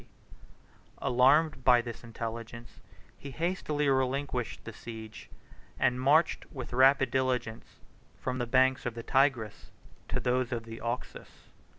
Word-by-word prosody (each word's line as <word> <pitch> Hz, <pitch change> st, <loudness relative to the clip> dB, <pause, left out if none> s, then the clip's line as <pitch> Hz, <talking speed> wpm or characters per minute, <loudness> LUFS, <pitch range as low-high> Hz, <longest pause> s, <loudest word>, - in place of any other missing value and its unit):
67 -, -, -5 dB
Alarmed 135 Hz, +4 st, +4 dB
by 125 Hz, -1 st, +6 dB
this 120 Hz, 0 st, -6 dB
intelligence, 115 Hz, 0 st, -7 dB, 0.4 s
he 140 Hz, -, -8 dB
hastily 155 Hz, -1 st, -1 dB
relinquished 130 Hz, -2 st, -1 dB
the 115 Hz, -, -8 dB
siege, 110 Hz, 0 st, -10 dB, 0.5 s
and 125 Hz, -1 st, +1 dB
marched 150 Hz, +5 st, +2 dB
with 130 Hz, -4 st, -7 dB
rapid 135 Hz, 0 st, +4 dB
diligence 125 Hz, -4 st, -2 dB, 0.4 s
from 130 Hz, 0 st, -3 dB
the 120 Hz, -, -2 dB
banks 130 Hz, +1 st, +3 dB
of 120 Hz, -, -4 dB
the 115 Hz, -, -6 dB
Tigris 130 Hz, -5 st, +1 dB, 0.4 s
to -, -, -2 dB
those 125 Hz, 0 st, 0 dB
of 120 Hz, -2 st, -3 dB
the 115 Hz, 0 st, -9 dB
Oxus. 120 Hz, +2 st, -6 dB
125 Hz, 130 wpm, -30 LUFS, 115-135 Hz, 0.5 s, by